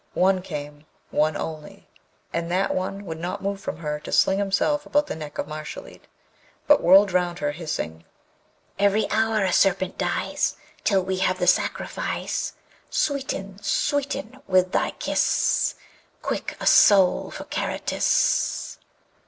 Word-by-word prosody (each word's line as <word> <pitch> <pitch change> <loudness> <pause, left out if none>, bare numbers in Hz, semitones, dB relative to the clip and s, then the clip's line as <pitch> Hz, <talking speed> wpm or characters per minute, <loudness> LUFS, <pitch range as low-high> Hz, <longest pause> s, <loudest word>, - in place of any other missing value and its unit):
One 185 0 +3
came, 150 -3 -7 0.2
one 155 +1 +1
only, 155 -2 -7 0.5
and 170 0 -2
that 190 +2 +1
one 195 +2 -3
would 160 -2 -6
not 175 +3 -4
move 200 0 -2
from 155 - -5
her 150 -2 -3
to 150 - -9
sling 190 +1 +3
himself 205 +10 +1
about 295 0 +2
the - - -5
neck 155 -2 -8
of - - -3
Mashalleed, 155 - -8 0.6
but 295 - +5
whirled 190 +3 +6
round 175 -1 0
her, 145 -2 -1
hissing: 145 - -5 0.8
Every 200 +1 +3
hour 220 -1 +2
a 185 - +1
serpent 190 -1 +2
dies, - - -1 0.3
Till 195 -3 +2
we 190 0 -2
have 185 0 +1
the 180 - 0
sacrifice: - - -1 0.4
Sweeten, 205 -9 -2
sweeten, 270 +2 -1
with 185 -1 +3
thy - - +1
kiss, - - +1 0.5
Quick! - - -3
a - - -5
soul 195 -3 +5
for - - -7
Karatis. - - 0
185 Hz, 140 wpm, -24 LUFS, 160-200 Hz, 0.8 s, whirled